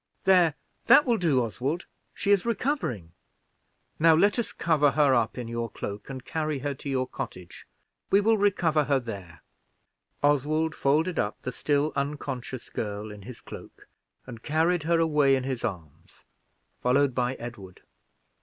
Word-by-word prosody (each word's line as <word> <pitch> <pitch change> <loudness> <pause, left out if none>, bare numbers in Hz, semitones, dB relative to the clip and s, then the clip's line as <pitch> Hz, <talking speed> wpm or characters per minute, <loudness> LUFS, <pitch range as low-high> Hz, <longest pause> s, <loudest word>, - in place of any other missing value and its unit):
There, 180 -5 +4 0.3
that 240 +6 +7
will 235 -4 +1
do, 145 -8 +2
Oswald, 135 - -3 0.3
she 200 - 0
is 200 -3 +4
recovering. 230 - -2 0.9
Now 160 0 +6
let 205 +8 +3
us 235 - -2
cover 155 -3 +2
her 145 -3 +4
up 120 -2 +1
in 120 -2 -5
your 115 0 -3
cloak, 100 +2 -7
and 130 -2 -7
carry 155 -2 -2
her 140 +2 -3
to 140 +1 -8
your 130 -1 0
cottage. 90 -7 -8 0.4
We 195 - +5
will 220 +2 +3
recover 170 -7 +2
her 140 -1 +2
there." 95 -9 -9 0.8
Oswald 150 +3 +2
folded 160 +6 +1
up 105 - -2
the 125 - -3
still 145 +3 0
unconscious 140 -3 -4
girl 105 0 -4
in 105 -1 -10
his 115 +4 -10
cloak, - - -12 0.4
and 115 -2 -9
earned 165 +3 +2
her 165 +2 +1
away 150 -4 +3
in 130 - -2
his 130 -2 -4
arms, 85 -9 -7 0.6
followed 130 +2 +2
by 125 +1 0
Edward. 115 -7 -10
140 Hz, 155 wpm, -27 LUFS, 120-160 Hz, 0.9 s, that